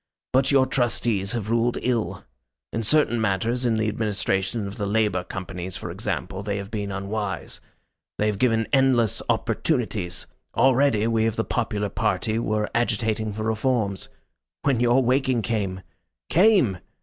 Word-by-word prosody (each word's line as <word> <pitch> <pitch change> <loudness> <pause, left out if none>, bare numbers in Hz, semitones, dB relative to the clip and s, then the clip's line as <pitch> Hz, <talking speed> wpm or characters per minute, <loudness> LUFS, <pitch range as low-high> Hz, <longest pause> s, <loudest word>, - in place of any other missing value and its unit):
But 135 +1 +3
your 135 -2 +5
Trustees 110 -5 0
have 110 -2 -3
ruled 115 +1 +2
ill. 120 -3 -1 0.5
In 115 - -1
certain 120 -1 +2
matters, 115 +5 0
in 115 - +2
the 110 0 0
administration 105 -1 -1
of 100 0 -7
the 100 - -2
Labour 105 -4 +1
Companies, 90 -1 -6
for - - -6
example, 95 - -3
they 100 0 -2
have 100 +1 -6
been 100 -2 -3
unwise. 100 0 -4 0.6
They 105 - +1
have 105 -2 0
given 115 -3 +2
endless 130 -5 +3
opportunities. 110 - -1 0.3
Already 135 -4 +4
we 115 -1 +2
of 110 - -1
the 110 - 0
popular 105 -4 -1
party 110 +2 0
were 105 -2 0
agitating 110 -2 0
for 110 +1 -4
reforms 110 -3 0 0.5
when 135 -4 +2
your 120 +2 +4
waking 130 -1 +2
came. 100 -5 -2 0.5
Came! 175 - +4
110 Hz, 150 wpm, -24 LUFS, 100-120 Hz, 0.6 s, your